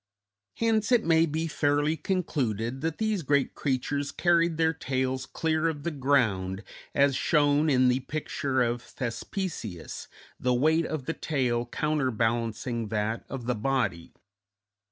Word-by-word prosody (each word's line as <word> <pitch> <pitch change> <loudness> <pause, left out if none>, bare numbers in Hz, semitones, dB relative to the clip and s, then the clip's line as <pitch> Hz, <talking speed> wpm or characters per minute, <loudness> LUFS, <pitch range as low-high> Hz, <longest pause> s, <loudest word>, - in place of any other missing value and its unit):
Hence 225 0 +1
it 240 -3 +4
may 165 0 +4
be 160 +2 -2
fairly 145 0 +1
concluded 135 - -2
that 160 0 -2
these 215 -3 0
great 140 -2 +1
creatures 140 +1 -1
carried 170 -2 +2
their 160 0 +3
tails 130 -3 -2
clear 160 0 0
of 145 -3 -5
the 170 - -1
ground, 110 -10 +1 0.3
as 140 -1 +4
shown 150 0 +3
in 130 -2 +4
the 125 +1 +3
picture 135 -2 -1
of 120 0 -1
Thespesius, 120 - -5 0.3
the 125 0 +1
weight 160 +6 +3
of 155 -5 -4
the 165 - -1
tail 125 -7 -1
counterbalancing 115 -5 -1
that 110 +2 -2
of 130 -4 -5
the 125 - +1
body. 105 -7 -1
140 Hz, 135 wpm, -28 LUFS, 120-160 Hz, 0.3 s, it